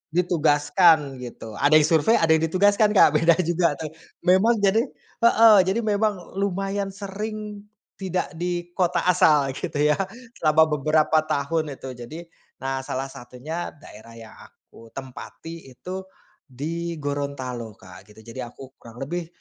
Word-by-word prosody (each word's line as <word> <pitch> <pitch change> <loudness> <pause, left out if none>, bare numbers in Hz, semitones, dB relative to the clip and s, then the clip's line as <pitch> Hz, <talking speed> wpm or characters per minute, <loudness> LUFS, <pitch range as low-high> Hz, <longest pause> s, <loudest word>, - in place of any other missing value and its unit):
ditugaskan, 155 -3 +3
gitu, 115 -3 -9
ada 145 +2 +4
yang 155 - +7
survei, 165 +8 +4
ada 165 -1 +2
yang 160 - +5
ditugaskan, 205 +4 +3
Kak, - - +7
beda 165 0 +4
juga 170 -2 +1
tuh. 155 0 -7 0.3
Memang, 190 +6 +4
jadi 200 +3 +4 0.4
heeh, 230 -2 +6
jadi 195 +5 +1
memang 205 -3 -1
lumayan 195 +1 -2
sering, 210 +1 -7 0.3
tidak 185 -1 -2
di 175 0 -3
kota 180 -1 0
asal 150 -6 +3
gitu 130 - -6 0.2
ya, - - +1 0.4
selama 155 0 +4 0.2
beberapa 155 +2 +3
tahun, 150 +1 -1
itu. 130 0 -8
Jadi, 155 +8 -8 0.3
nah 135 0 -3
salah 135 0 -5
satunya, 135 +10 -7
daerah 115 -5 -14
yang 115 -1 -12
aku 115 - -17
tempati 135 +4 -9
itu, 185 +9 -8 0.4
di 165 +6 -5
Gorontalo 140 -6 -4
Kak, 95 0 -15
gitu. 110 +1 -17
Jadi 115 +3 -10
aku 130 +2 -9
kurang 120 +3 -9
lebih, 170 +4 -4
160 Hz, 140 wpm, -23 LUFS, 135-185 Hz, 0.4 s, yang